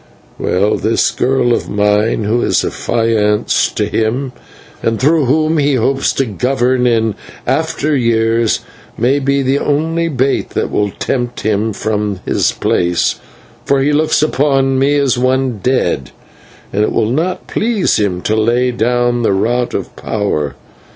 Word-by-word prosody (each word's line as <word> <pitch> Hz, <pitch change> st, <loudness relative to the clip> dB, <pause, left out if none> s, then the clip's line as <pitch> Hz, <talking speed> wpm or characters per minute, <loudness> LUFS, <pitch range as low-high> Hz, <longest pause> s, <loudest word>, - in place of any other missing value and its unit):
Well, 100 Hz, +4 st, +1 dB
this 115 Hz, -, +1 dB
girl 130 Hz, -2 st, +1 dB
of -, -, -2 dB
mine, 105 Hz, +2 st, +1 dB
who 110 Hz, +4 st, 0 dB
is -, -, +1 dB
affianced 110 Hz, -3 st, 0 dB
to -, -, +1 dB
him, 125 Hz, +4 st, -1 dB, 0.5 s
and 115 Hz, -1 st, -1 dB
through 150 Hz, +2 st, +3 dB
whom 155 Hz, +4 st, +2 dB
he 145 Hz, -1 st, +2 dB
hopes 135 Hz, +3 st, +1 dB
to 135 Hz, -, 0 dB
govern 125 Hz, +2 st, 0 dB
in 115 Hz, -2 st, +1 dB, 0.3 s
after 155 Hz, +2 st, 0 dB
years, 115 Hz, -2 st, +1 dB, 0.4 s
may 130 Hz, +5 st, +2 dB
be 140 Hz, 0 st, 0 dB
the 135 Hz, +2 st, +1 dB
only 160 Hz, +3 st, 0 dB
bait 135 Hz, -3 st, 0 dB
that -, -, -1 dB
will 105 Hz, 0 st, 0 dB
tempt 120 Hz, +4 st, -3 dB
him 110 Hz, +1 st, 0 dB
from 105 Hz, -1 st, -2 dB
his -, -, +1 dB
place, 85 Hz, -1 st, 0 dB, 0.4 s
for 140 Hz, -, +1 dB
he 145 Hz, +2 st, +1 dB
looks 155 Hz, 0 st, +2 dB
upon 135 Hz, -3 st, +1 dB
me 140 Hz, +2 st, +2 dB
as 135 Hz, -4 st, +1 dB
one 130 Hz, -2 st, 0 dB
dead, 90 Hz, -, 0 dB, 0.6 s
and 100 Hz, -, +1 dB
it 105 Hz, -, +1 dB
will 110 Hz, -, 0 dB
not 170 Hz, +7 st, -1 dB
please 220 Hz, -3 st, 0 dB
him 95 Hz, -4 st, -1 dB
to 110 Hz, -, 0 dB
lay 120 Hz, +3 st, +2 dB
down 120 Hz, +1 st, 0 dB
the 110 Hz, -, +2 dB
rod 120 Hz, +5 st, 0 dB
of -, -, -5 dB
power. 100 Hz, -9 st, -2 dB
120 Hz, 150 wpm, -15 LUFS, 110-135 Hz, 0.6 s, through